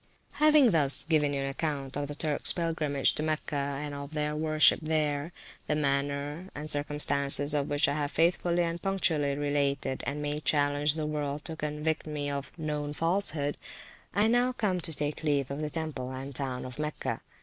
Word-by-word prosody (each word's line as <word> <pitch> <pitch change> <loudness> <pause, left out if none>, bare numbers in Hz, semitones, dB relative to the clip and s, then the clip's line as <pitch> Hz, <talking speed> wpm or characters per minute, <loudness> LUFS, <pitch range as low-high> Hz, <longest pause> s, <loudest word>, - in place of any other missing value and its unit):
Having 300 -5 +6
thus 145 -5 +6
given 155 -3 +2
you 140 -1 -1
an 135 - -2
account 140 -2 -3
of 145 0 -2
the 145 - -6
Turks 150 -1 0
pilgrimage 155 -5 0
to - - -3
Mecca, 145 -2 -2
and 150 -1 -5
of 140 +2 -7
their 150 0 -1
worship 155 0 +5
there 155 0 -1 0.4
(the 150 - +1
manner 145 +4 -2
and 150 +1 -6
circumstances 145 -1 +4
of 145 -2 0
which 145 0 +2
I 140 - 0
have 145 -1 -2
faithfully 170 +2 +1
and 170 0 -3
punctually 160 -7 0
related, 140 -2 -1
and 145 +1 -2
may 150 0 -2
challenge 145 0 +1
the 155 -1 -2
world 150 -1 -3
to 160 - -2
convict 150 +1 -2
me 145 -1 -2
of 140 -1 -4
a - - -10
known 150 -1 -3
falsehood), 165 -3 0 0.5
I 205 +3 +2
now 245 +2 +2
come 200 -7 -1
to 165 - -1
take 150 -1 -3
leave 145 -4 0
of 140 - -4
the 150 - -2
temple 150 -5 -5
and 135 +2 -7
town 130 -2 -3
of 130 +2 -9
Mecca. 150 0 -3
150 Hz, 185 wpm, -29 LUFS, 145-160 Hz, 0.5 s, Having